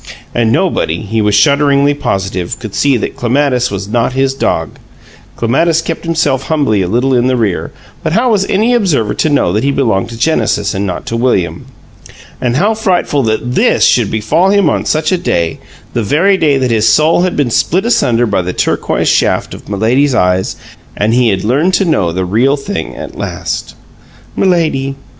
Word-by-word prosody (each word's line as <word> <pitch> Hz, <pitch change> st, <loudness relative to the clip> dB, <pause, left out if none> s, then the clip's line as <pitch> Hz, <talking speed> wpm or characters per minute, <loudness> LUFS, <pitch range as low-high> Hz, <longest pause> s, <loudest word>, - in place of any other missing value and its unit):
And 115 Hz, -2 st, +1 dB
nobody, 120 Hz, -, 0 dB
he 110 Hz, +2 st, -1 dB
was 105 Hz, -1 st, +2 dB
shudderingly 140 Hz, +4 st, +3 dB
positive, 95 Hz, -10 st, -3 dB
could 110 Hz, -4 st, -8 dB
see 140 Hz, -3 st, +2 dB
that -, -, -4 dB
Clematis 125 Hz, 0 st, 0 dB
was 100 Hz, 0 st, -5 dB
not 115 Hz, +3 st, 0 dB
his 135 Hz, 0 st, 0 dB
dog 80 Hz, -, -2 dB, 0.6 s
(Clematis 160 Hz, +8 st, +1 dB
kept 165 Hz, +1 st, -5 dB
himself 145 Hz, -5 st, 0 dB
humbly 140 Hz, -10 st, +1 dB
a 90 Hz, -, -1 dB
little 125 Hz, +7 st, 0 dB
in 125 Hz, 0 st, +2 dB
the 130 Hz, -1 st, +1 dB
rear, 105 Hz, -6 st, -1 dB, 0.3 s
but -, -, -2 dB
how 235 Hz, +4 st, +2 dB
was 205 Hz, -3 st, +2 dB
any 220 Hz, +5 st, +1 dB
observer 155 Hz, -, +1 dB
to 155 Hz, -, 0 dB
know 140 Hz, -11 st, +1 dB
that 105 Hz, -, 0 dB
he 140 Hz, -, +1 dB
belonged 115 Hz, -9 st, 0 dB
to 115 Hz, -, -8 dB
Genesis 110 Hz, -7 st, 0 dB
and 100 Hz, +1 st, -2 dB
not 90 Hz, -, -5 dB
to 115 Hz, -, -4 dB
William?) 115 Hz, -7 st, -1 dB, 0.7 s
And 120 Hz, -1 st, 0 dB
how 205 Hz, +10 st, +2 dB
frightful 185 Hz, -9 st, 0 dB
that 120 Hz, +3 st, -2 dB
THIS -, -, +3 dB
should -, -, +2 dB
befall 150 Hz, -, +1 dB
him 200 Hz, -6 st, +3 dB
on -, -, -2 dB
such 155 Hz, 0 st, 0 dB
a 185 Hz, -, +1 dB
day, 85 Hz, -, -1 dB, 0.3 s
the 120 Hz, -, 0 dB
very 165 Hz, -, +2 dB
day 150 Hz, -6 st, +2 dB
that 130 Hz, -2 st, 0 dB
his 110 Hz, -1 st, +2 dB
soul 160 Hz, +3 st, +3 dB
had 185 Hz, 0 st, -1 dB
been 140 Hz, -5 st, 0 dB
split 185 Hz, -, +1 dB
asunder 120 Hz, -, +2 dB
by 105 Hz, -4 st, 0 dB
the 90 Hz, +1 st, -4 dB
turquoise -, -, -1 dB
shafts -, -, +1 dB
of -, -, -12 dB
Milady's 120 Hz, +7 st, +1 dB
eyes 90 Hz, -3 st, +1 dB, 0.4 s
and 105 Hz, +2 st, +1 dB
he 120 Hz, -1 st, +3 dB
had 95 Hz, -2 st, -1 dB
learned 145 Hz, -, +1 dB
to 195 Hz, -, +1 dB
know 100 Hz, -, +1 dB
the 90 Hz, +2 st, -2 dB
Real 120 Hz, +10 st, +1 dB
Thing 200 Hz, +9 st, -5 dB
at -, -, -8 dB
last! -, -, -4 dB, 0.6 s
"Milady! 155 Hz, -7 st, 0 dB
130 Hz, 190 wpm, -13 LUFS, 110-155 Hz, 0.7 s, shudderingly